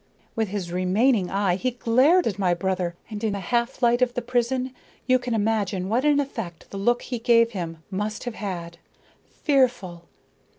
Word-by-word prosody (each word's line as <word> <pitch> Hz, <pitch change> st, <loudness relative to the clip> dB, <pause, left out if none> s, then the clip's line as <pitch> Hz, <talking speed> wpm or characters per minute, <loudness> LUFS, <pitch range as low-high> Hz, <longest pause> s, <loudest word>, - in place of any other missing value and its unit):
"With 220 Hz, -1 st, 0 dB
his 190 Hz, -3 st, -4 dB
remaining 185 Hz, +3 st, +2 dB
eye 195 Hz, -2 st, +1 dB
he 255 Hz, +6 st, 0 dB
glared 255 Hz, +9 st, +3 dB
at 205 Hz, -3 st, -2 dB
my 180 Hz, -3 st, +2 dB
brother, 180 Hz, -1 st, -2 dB, 0.2 s
and 210 Hz, 0 st, -6 dB
in 215 Hz, -2 st, 0 dB
the 200 Hz, -, -3 dB
half 235 Hz, +6 st, -1 dB
light 240 Hz, +1 st, +4 dB
of 250 Hz, -1 st, +2 dB
the 245 Hz, -, -2 dB
prison 250 Hz, +1 st, -1 dB, 0.3 s
you 255 Hz, 0 st, +4 dB
can 245 Hz, -2 st, -2 dB
imagine 205 Hz, -3 st, 0 dB
what 245 Hz, +6 st, +1 dB
an 295 Hz, -1 st, +4 dB
effect 225 Hz, -12 st, -5 dB
the 200 Hz, -, -6 dB
look 240 Hz, +4 st, +1 dB
he 245 Hz, -2 st, -4 dB
gave 230 Hz, -1 st, +4 dB
him 165 Hz, -5 st, -6 dB
must 210 Hz, +3 st, -3 dB
have 245 Hz, -, -4 dB
had 170 Hz, -5 st, -6 dB, 0.5 s
fearful! 245 Hz, -, 0 dB
220 Hz, 180 wpm, -24 LUFS, 185-245 Hz, 0.5 s, light